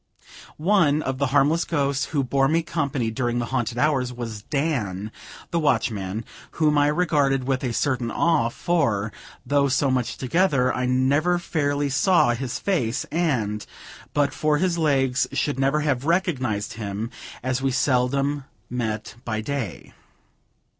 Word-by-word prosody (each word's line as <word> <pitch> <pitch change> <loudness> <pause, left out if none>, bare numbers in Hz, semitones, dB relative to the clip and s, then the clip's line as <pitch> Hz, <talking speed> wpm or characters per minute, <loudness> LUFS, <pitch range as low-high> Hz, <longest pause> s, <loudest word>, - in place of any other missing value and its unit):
One 155 -4 +3
of 130 0 -3
the 140 - +2
harmless 145 +5 +3
ghosts 140 -3 0
who 145 -3 -1
bore 135 +2 +2
me 165 +3 +2
company 140 -8 -1
during 120 +1 -1
the 120 - 0
haunted 120 -2 -1
hours, 130 -3 +1
was 115 -4 -6
Dan, 110 - -2 0.4
the 170 - +1
watchman, 110 - 0 0.3
whom 155 -2 +2
I 145 0 +4
regarded 145 -5 +2
with 135 0 0
a 125 - -1
certain 125 -1 0
awe; 155 -4 +2
for, 115 -9 0 0.3
though 140 +2 +2
so 135 0 +2
much 125 -2 -1
together, 135 -2 +2
I 125 0 -1
never 140 +7 +2
fairly 145 -4 -1
saw 175 - +3
his 120 0 -3
face, 135 - -1
and, 120 -11 0 0.5
but 145 -1 +1
for 150 -1 +1
his 175 0 0
legs, 135 -4 +2
should 145 -3 -1
never 135 +3 +2
have 140 -4 0
recognized 135 - 0
him, 105 +3 -4 0.3
as 130 +1 -1
we 135 - +1
seldom 135 +2 +1 0.3
met 110 -4 -3
by 110 -3 -2
day. 120 -4 -4
135 Hz, 145 wpm, -24 LUFS, 120-150 Hz, 0.5 s, I